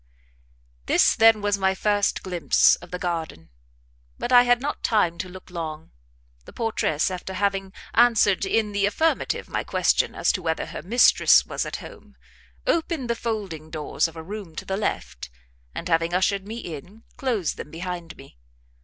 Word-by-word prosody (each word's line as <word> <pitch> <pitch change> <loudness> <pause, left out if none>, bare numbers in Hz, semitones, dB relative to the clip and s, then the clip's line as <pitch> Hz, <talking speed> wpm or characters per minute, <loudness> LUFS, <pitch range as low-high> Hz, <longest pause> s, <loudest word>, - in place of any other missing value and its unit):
This, - - +4
then, 225 -1 +5
was 205 -1 +1
my 190 0 +2
first 205 0 0
glimpse 180 -3 +3
of 175 - -14
the 180 - -4
garden; 165 - -4 0.7
but 245 - -4
I 245 -1 +9
had 245 0 +5
not 285 +3 -4
time 175 -6 +1
to 185 - -4
look 185 0 -12
long, 160 -2 -6 0.5
the - - -12
portress, 205 -8 0
after 185 +1 -6
having 195 -1 -1 0.2
answered 225 -5 +4
in 210 +2 0
the 200 0 +1
affirmative 320 +10 0
my - - -2
question - - +1
as - - +2
to 185 - -3
whether 160 -2 -1
her - - -7
mistress 235 +7 +5
was - - -3
at - - -5
home, - - -14 0.5
opened 330 - 0
the - - 0
folding 200 -10 -4
doors 155 +1 -1
of 165 - -13
a 160 - -7
room 195 -2 -8
to - - -6
the 190 - -2
left, 130 - -4 0.5
and - - -5
having 165 0 +1
ushered 195 +1 +1
me 225 +2 -6
in, 180 +3 -9
closed 230 - -1
them - - -7
behind 170 0 -6
me. 135 - -16
190 Hz, 170 wpm, -24 LUFS, 170-220 Hz, 0.7 s, I